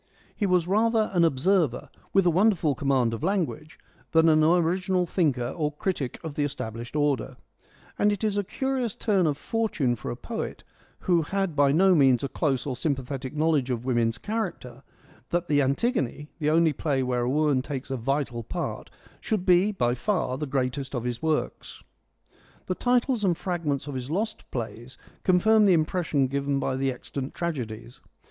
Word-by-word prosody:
He 205 - 0
was 180 -2 +2
rather 220 +2 +2
an 175 -2 +4
observer, 160 -2 +1 0.2
with 195 -1 +3
a 175 - +5
wonderful 180 -4 +3
command 130 -3 +1
of 115 - -5
language, 165 -4 -2 0.4
than 160 0 +5
an 155 0 +4
original 180 +2 +2
thinker 140 -9 0
or 150 +1 -2
critic 150 - -3
of 160 -3 -5
the 145 - -1
established 120 -3 -5
order; 140 -3 0 0.6
and 210 - +4
it 205 +1 -3
is 210 -2 +1
a 205 - +1
curious 260 +1 -2
turn 195 -6 +1
of 145 -2 0
fortune 165 - -1
for - - -7
a - - -3
poet, - - -6 0.4
who 175 -2 +2
had 190 +1 -2
by 140 -1 +4
no 185 +5 +5
means 135 -6 +4
a - - 0
close 135 -2 -1
or 140 - -2
a - - -3
sym 140 +3 0
pathetic 135 +1 -6
knowledge 150 -4 +1
of 125 -1 -2
woman's 120 -2 +1
character, 135 - -4 0.5
that 175 0 -1
the 145 -2 +3
Antigone, 150 - 0
the 150 -1 +1
only 160 0 +3
play 135 -2 -1
where 125 -1 0
a 120 - 0
woman 145 -1 +2
takes 135 -1 -6
a - - 0
vital 130 -1 -2
part, 170 +10 -5 0.3
should 210 -5 -2
be 185 +3 +4
by 120 -12 0
far 130 - -1
the 150 +2 -4
greatest 135 0 -2
of 120 - -2
his 120 -1 -3
works. 160 -1 -2 0.8
The 185 - -1
titles 245 +2 +1
and 175 -4 +2
fragments 165 -7 -2
of 145 - -6
his 130 0 -5
lost 215 +7 -3
plays 120 +1 -6 0.2
confirm 210 +4 +4
the 195 - +5
impression 155 -3 +1
given 140 +1 -1
by 130 - -1
the 135 0 0
extant 130 +2 -6
tragedies. 125 -7 -5
150 Hz, 180 wpm, -26 LUFS, 130-185 Hz, 0.8 s, a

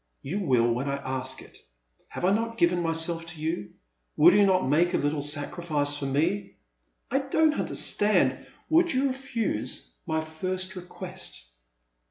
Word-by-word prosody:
You 175 +9 -3
will 125 - +2
when 130 +4 -2
I 140 - 0
ask 130 -1 -4
it. - - -16 0.5
Have - - -4
I 185 - +4
not 230 +2 -1
given 175 -2 +3
myself 165 0 0
to 170 -2 -8
you? 155 -9 -3 0.4
Will 170 +4 +7
you 205 -1 +5
not 185 -5 +2
make 170 +6 +3
a - - +4
little 145 0 0
sacrij&ce 145 0 -1
for 140 - -3
me?*' 165 +9 0 0.3
" - - -44
I 270 - +3
don*t 305 +3 +2
understand 210 +1 +2
— - - -34
"Would 335 -2 +4
you 270 +1 +2
refuse 235 - -3 0.2
my 160 0 0
j&rst 185 +4 -3
request - - -7
170 Hz, 165 wpm, -27 LUFS, 145-200 Hz, 0.5 s, Will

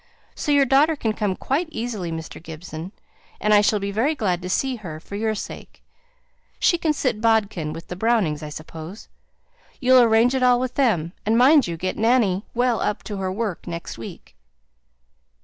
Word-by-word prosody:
So 300 - -2
your 285 -1 +5
daughter 280 +5 +4
can 225 -6 -1
come 205 -3 -1
quite 295 - -1
easily, 225 - -4
Mr. 160 -1 -7
Gibson, 165 +1 -8 0.5
and 210 - +2
I 205 - +7
shall 210 +1 +2
be 200 0 -3
very 250 +10 +1
glad 185 -8 -1
to 180 - -5
see 260 +6 0
her 165 -8 -8
for 180 - -14
your 220 +1 -1
sake. - - -9 0.7
She 345 - +2
can 320 -2 +1
sit 255 -7 -1
bodkin 215 -8 +1
with 165 +2 -8
the 180 - -6
Brownings, 195 -8 +1
I 150 - -6
suppose? 160 +5 -9 0.7
You'll 255 0 +6
arrange 230 +2 +4
it 265 - 0
all 250 -1 +4
with 255 0 -2
them; 185 - +1
and 220 +2 +2
mind 270 - +6
you 170 -1 -4
get 185 +3 -3
Nanny 220 -4 +2
well 245 -1 +1
up 210 - -1
to 205 - -5
her 190 -1 -2
work 200 -3 -4
next 170 -8 -6
week." 115 - -10
215 Hz, 185 wpm, -23 LUFS, 180-250 Hz, 0.7 s, I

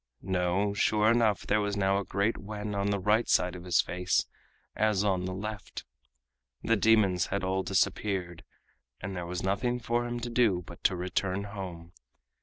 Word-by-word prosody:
No, 95 +2 0
sure 105 +2 +3
enough 115 -3 +2
there 105 +1 +2
was 105 0 -2
now 95 0 +2
a - - -3
great 100 +4 0
wen 105 +1 -6
on 100 0 0
the 100 - +1
right 105 +4 +2
side 90 0 +2
of 90 0 -9
his 90 -2 +4
face 90 +1 0 0.5
as 105 -2 +2
on 95 -3 +1
the 95 - -3
left. 105 +1 -6 0.8
The 115 - +3
demons 100 -5 +3
had 100 0 -2
all 95 +1 0
disappeared, 95 -2 -1 0.6
and 95 0 -5
there 90 -1 -4
was 90 0 -4
nothing 120 +6 0
for 120 +1 -1
him 120 0 -3
to 120 - -4
do 110 -7 +2
but - - -12
to 95 - +4
return 95 +2 -2
home. 90 -4 -8
100 Hz, 180 wpm, -29 LUFS, 90-105 Hz, 0.8 s, his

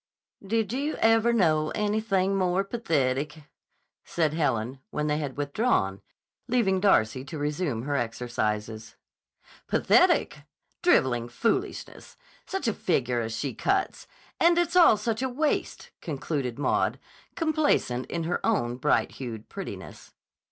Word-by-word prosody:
"Did 220 +1 -1
you 285 +4 -1
ever 225 +1 +3
know 155 -9 +2
anything 205 -2 0
more 185 0 +1
pathetic!" 150 - -1 0.6
said 160 -3 0
Helen, 130 -5 -1
when 150 - -2
they 150 0 0
had 140 -3 -5
withdrawn, 145 - 0 0.5
leaving 225 -7 +2
Darcy 130 - +2
to 160 - -7
resume 145 -4 -2
her 145 +1 -2
exercises. 110 -3 -3 0.7
"Pathetic! - - +3 0.4
Driveling 120 -2 +2
foolishness! 375 - -3 0.3
Such 385 -9 -3
a 225 - +2
figure 125 -11 0
as 115 0 -4
she 135 +3 -3
cuts! 390 0 -1 0.3
And 340 +1 +5
it's 345 0 +1
all 340 -11 +7
such 220 +2 -2
a 260 - 0
waste," 295 +5 -2
concluded 135 -5 -3
Maud, 145 - +1 0.4
complacent 310 - +1
in 170 - -3
her 170 +2 -2
own 120 0 0
bright 150 +3 +1
hued 115 -5 -7
prettiness. - - -9
155 Hz, 125 wpm, -27 LUFS, -, 0.7 s, all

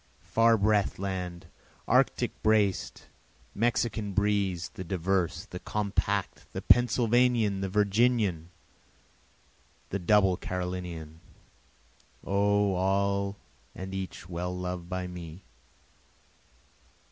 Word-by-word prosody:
Far 115 0 +4
breath'd 105 -1 +2
land! 90 -3 -4 0.4
Arctic - - +2
braced! 105 -3 +1 0.5
Mexican 115 -2 0
breez'd! 100 -4 0
the 95 - -6
diverse! 90 0 -1
the - - -8
compact! 100 -1 -2
The - - -4
Pennsylvanian! 120 -3 +3
the 95 - -2
Virginian! 105 -4 +2 1.4
the 100 - -2
double 95 0 +3
Carolinian! 90 -3 -5 1.0
O 100 0 +2
all 100 +1 0 0.4
and 95 +1 -7
each 95 -2 -6
well 90 +1 -4
loved 90 -1 -5
by 90 0 -3
me! 90 0 -8
95 Hz, 90 wpm, -29 LUFS, 90-105 Hz, 1.4 s, Far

